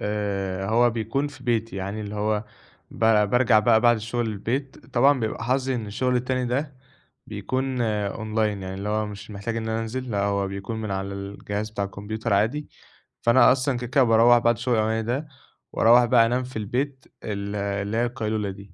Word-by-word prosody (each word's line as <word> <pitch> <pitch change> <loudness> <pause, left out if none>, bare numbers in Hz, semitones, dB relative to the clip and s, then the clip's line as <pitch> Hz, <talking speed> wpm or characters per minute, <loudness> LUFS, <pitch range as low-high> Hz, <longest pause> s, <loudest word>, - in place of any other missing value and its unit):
آآ 100 -2 -2
هو 120 +2 +4
بيكون 115 +5 -1
في 130 -3 -14
بيتي 115 -4 -1
يعني 100 +3 -4
اللي 105 0 -6
هو 105 +1 0 0.5
ب - - -12 0.3
بارجَع 125 -2 +4
بقى 110 +1 +4
بعد 120 0 +5
الشغل 115 +2 -2
البيت، 120 +5 -4
طبعًا 135 +2 +4
بيبقى 110 +1 -3
حظي 130 +1 0
إن 115 -3 -3
الشغل 125 +5 0
التاني 125 0 -1
ده 140 +4 -2 0.5
بيكون 130 -1 -2
أونلاين 105 -1 -1
يعني 95 0 -5
اللي 100 +2 -4
هو 110 0 0
مش 105 +1 -9
محتاج 105 +3 -4
إن 110 0 -3
أنا 110 0 -1
أنزل، 125 +2 -4
لا 100 -1 0
هو 100 -1 0
بيكون 100 +3 -5
من 105 - -4
على 95 0 -2
الجهاز 100 +2 -5
بتاع 105 -2 -3
الكمبيوتر 105 +3 -3
عادي، 115 +10 0 0.5
فأنا 120 +2 +6
أصلًا 130 0 +1
كده 125 0 -5
كده 135 +2 +3
باروّح 115 +1 +6
بعد 120 0 +3
الشغل 120 +1 0
الأولاني 110 +1 +1
ده، 130 +7 -2 0.5
وأروّح 120 +2 +6
بقى 120 -1 +5
أنام 125 +2 0
في 125 -2 -7
البيت 130 +5 -3 0.2
ال 100 -1 -4
اللي 100 +1 -2
هي 120 - +2
القيلولة 110 -4 -2
دي، 100 -1 -11
110 Hz, 190 wpm, -24 LUFS, 105-125 Hz, 0.5 s, فأنا